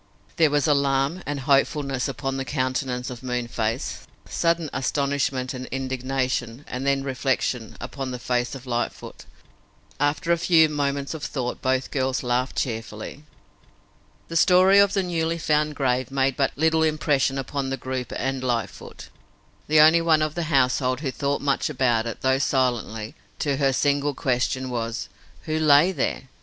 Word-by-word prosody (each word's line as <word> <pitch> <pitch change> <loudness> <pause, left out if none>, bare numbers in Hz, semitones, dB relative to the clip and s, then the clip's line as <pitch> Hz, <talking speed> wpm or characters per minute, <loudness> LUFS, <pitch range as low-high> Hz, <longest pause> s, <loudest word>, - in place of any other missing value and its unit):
There 160 -3 +5
was 145 0 +1
alarm 140 +3 +1
and 145 -1 -3
hopefulness 140 -1 +1
upon 135 -1 -3
the 135 - -2
countenance 130 -2 -2
of 125 - -8
Moonface, 120 -1 -3 0.2
sudden 170 -1 0
astonishment 135 -1 -1
and 130 0 -6
indignation, 130 -1 -2
and 130 +2 -4
then 140 0 +2
reflection, 130 -3 -2
upon 135 -2 -5
the 125 - -4
face 125 +1 -1
of 135 -1 -10
Lightfoot. 120 -1 -4 0.7
After 145 +4 0
a 170 - +3
few 165 -2 +5
moments 140 -1 -2
of 155 -2 -7
thought 125 -3 -3
both 130 0 0
girls 130 -1 -1
laughed 125 +2 0
cheerfully. 115 +3 -4 1.0
The 165 - -7
story 185 +3 +6
of 200 0 +4
the 195 - +1
newly 165 -2 -1
found 150 -1 +1
grave 130 -3 0
made 135 -1 +1
but 140 - +1
little 160 +1 +2
impression 150 -3 +1
upon 135 +1 -3
the 135 - -2
group 130 -1 -4
and 135 0 -2
Lightfoot, 115 -6 -4 0.6
the 155 0 +6
only 160 +2 +6
one 160 -2 +3
of 155 -1 -2
the 170 0 -2
household 130 -2 +2
who 135 -4 -2
thought 140 +1 -1
much 140 +1 0
about 120 -5 +1
it, 115 - -6
thought 130 +1 +2
silently. 120 -5 -1 0.2
To 140 -2 -1
her 140 - +2
the 135 - +1
single 145 +1 +1
question 130 0 -1
was: 115 0 -3 0.3
"Who 155 0 -1
lay 155 +3 +5
there?" 185 - -2
135 Hz, 160 wpm, -24 LUFS, 125-150 Hz, 1.0 s, story